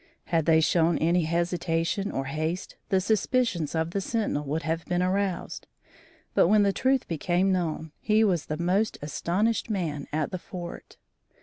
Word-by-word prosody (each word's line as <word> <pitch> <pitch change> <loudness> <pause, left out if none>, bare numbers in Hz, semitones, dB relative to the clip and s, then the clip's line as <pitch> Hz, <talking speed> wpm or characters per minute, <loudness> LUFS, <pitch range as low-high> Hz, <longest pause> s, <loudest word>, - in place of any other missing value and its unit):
Had 165 -2 0
they 160 -1 +5
shown 165 0 +3
any 170 +1 +2
hesitation 170 +3 0
or 135 - -2
haste, 155 +6 -3
the 190 - +3
suspicions 205 - 0
of 160 +1 0
the 200 - -1
sentinel 210 -8 -1
would 155 +4 -2
have 165 +1 -1
been 180 0 0
aroused, 190 0 -2 0.7
but - - +5
when 210 +2 +5
the 200 -1 +2
truth 260 +3 +1
became 175 +4 +1
known, 160 -3 -1
he 215 +1 +3
was 180 -7 +1
the 155 - -3
most 190 +6 +1
astonished 195 +11 0
man 160 -9 -2
at 155 0 -1
the 185 - -3
fort. 175 -1 -8
175 Hz, 165 wpm, -27 LUFS, 160-195 Hz, 0.7 s, they